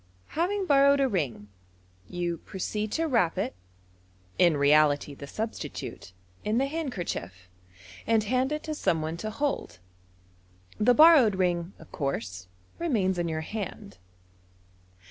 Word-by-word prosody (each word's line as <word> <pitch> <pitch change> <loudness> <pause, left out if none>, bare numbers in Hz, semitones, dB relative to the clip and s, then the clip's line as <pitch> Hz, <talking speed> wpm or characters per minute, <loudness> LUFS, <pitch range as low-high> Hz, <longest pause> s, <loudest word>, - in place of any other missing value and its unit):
Having 380 +5 -1
borrowed 280 -2 +5
a 270 - +3
ring, 130 - -2 0.6
you 175 -2 -3
proceed 210 +2 -4
to 330 - 0
wrap 230 - +1
it - - -1 0.9
(in 170 -4 +5
reality 145 0 +3
the 140 0 -10
substitute) 215 - -6 0.3
in 215 +2 0
the 265 - +2
handkerchief, 180 - -5 0.6
and 225 -1 +3
hand 255 +5 0
it 300 0 -3
to 310 - -4
some 165 - 0
one 160 +2 -4
to 215 +5 -4
hold. 265 - -3 1.0
The 245 +3 +4
borrowed 300 - +7
ring, 175 -1 0
of - - -16
course, 105 - -4 0.3
remains 205 - 0
in 170 - 0
your 160 0 -2
hand. 205 +3 -6
200 Hz, 130 wpm, -27 LUFS, -, 1.0 s, borrowed